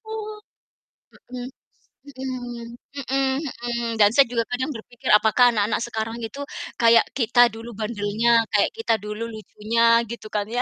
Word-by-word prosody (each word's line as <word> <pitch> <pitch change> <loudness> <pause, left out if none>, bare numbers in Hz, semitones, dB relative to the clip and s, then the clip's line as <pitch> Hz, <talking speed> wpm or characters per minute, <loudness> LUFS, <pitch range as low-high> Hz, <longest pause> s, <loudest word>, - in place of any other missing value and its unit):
U - - -8 1.2
mhm, 250 0 -5 0.6
mhm. 255 -3 -6 0.5
Mhm 270 - +2 0.4
mhm, 240 0 -2 0.2
dan 205 -1 +7
saya 280 - +8
juga 230 -1 +1
kadang 260 +4 -1
berpikir 240 +3 -8
apakah 245 +3 +4
anak-anak 210 -1 0
sekarang 225 -1 -4
itu 225 +5 -6 0.4
kayak 230 0 +6 0.2
kita 240 0 +1
dulu 225 +1 -9
bandelnya, 215 +1 -1 0.2
kayak 205 - +3
kita 450 - +1
dulu 210 +2 -5
lucunya 220 +1 -3 0.3
gitu 235 -2 -7
kan 205 -1 0
ya. - - +3
235 Hz, 140 wpm, -23 LUFS, 220-245 Hz, 1.2 s, saya